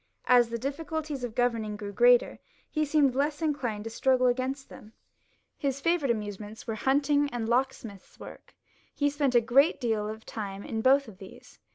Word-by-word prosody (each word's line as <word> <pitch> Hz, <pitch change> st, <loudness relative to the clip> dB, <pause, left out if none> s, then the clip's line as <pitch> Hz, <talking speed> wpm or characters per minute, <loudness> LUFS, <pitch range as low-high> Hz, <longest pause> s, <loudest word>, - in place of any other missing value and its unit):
As 245 Hz, -2 st, +5 dB
the 235 Hz, -, -3 dB
difficulties 290 Hz, +2 st, -4 dB
of 235 Hz, -3 st, -5 dB
governing 230 Hz, -4 st, 0 dB
grew 205 Hz, -1 st, -7 dB
greater, -, -, +4 dB, 0.3 s
he 310 Hz, -1 st, 0 dB
seemed 290 Hz, -3 st, +3 dB
less 290 Hz, +3 st, -1 dB
inclined 260 Hz, -9 st, -2 dB
to 225 Hz, -, -6 dB
struggle 255 Hz, +2 st, +2 dB
against 260 Hz, +2 st, -1 dB
them. 215 Hz, +1 st, -14 dB, 0.7 s
His 275 Hz, -1 st, -1 dB
favourite 335 Hz, -2 st, +1 dB
amusements 210 Hz, -1 st, -4 dB
were 225 Hz, -, -3 dB
hunting 285 Hz, +5 st, +1 dB
and 235 Hz, -3 st, -4 dB
lock 255 Hz, +3 st, +2 dB
smith's 200 Hz, -7 st, -13 dB
work; -, -, -12 dB, 0.4 s
he 285 Hz, 0 st, +1 dB
spent 280 Hz, -3 st, 0 dB
a 240 Hz, -, +6 dB
great 275 Hz, +7 st, +3 dB
deal 220 Hz, -4 st, -1 dB
of 220 Hz, +1 st, -8 dB
time 200 Hz, -2 st, -6 dB
in 225 Hz, -2 st, -3 dB
both 270 Hz, +3 st, +4 dB
of 195 Hz, -4 st, -13 dB
these. 190 Hz, -, -14 dB
250 Hz, 180 wpm, -28 LUFS, 220-285 Hz, 0.7 s, a